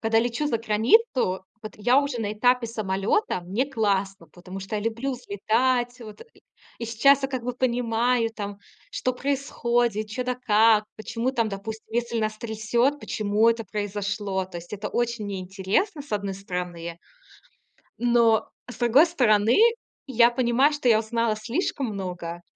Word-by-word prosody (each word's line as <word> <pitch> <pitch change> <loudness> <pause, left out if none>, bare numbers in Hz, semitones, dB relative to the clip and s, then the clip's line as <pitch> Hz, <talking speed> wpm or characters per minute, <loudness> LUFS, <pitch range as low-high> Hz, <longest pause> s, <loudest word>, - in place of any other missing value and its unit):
когда 225 0 +2
лечу 240 +5 0
за 280 - +1
границу, 230 - +3 0.5
вот 215 - -7
я 245 +6 +4
уже 280 -4 -3
на 210 -2 -2
этапе 245 +2 +2
самолёта, 200 - -1
мне 200 +10 -1
классно, 200 -7 -1
потому 185 +2 -9
что 195 +3 -4
я - - -2
люблю 230 +5 -2
взлетать, 245 +2 0
вот 215 - -10
и - - -22 0.4
И 235 - -4
сейчас 270 +5 +4
я 270 - 0
как 260 -3 -4
бы 250 - -2
понимаю, 240 -1 +1
там, 205 -2 -6 0.3
что 255 - -1
происходит, 240 -5 -1
чё 230 +4 -4
да 250 0 -1
как, 220 -2 +4
почему 230 +3 -2
там, 230 -4 0
допустим, 215 +3 -7
если 235 0 -1
нас 215 0 -2
трясёт, 235 +5 0
почему 210 -3 0
это 230 0 +1
произошло. 205 -1 -3
То 185 -1 -9
есть 170 +2 -10
это 210 0 -4
очень 235 -3 -2
мне 195 -2 -4
интересно, 195 - -1
с 290 - -13
одной 200 -1 -1
стороны. 180 -3 -5 1.0
Но 235 -2 +3 0.2
с 245 - -8
другой 245 +7 +5
стороны, 230 -8 +3 0.5
я 240 -2 +4
понимаю, 250 +4 +2
что 290 -4 0
я 220 - +5
узнала 225 0 0
слишком 255 - -2
много. 180 -5 -5
225 Hz, 160 wpm, -25 LUFS, 205-245 Hz, 1.0 s, другой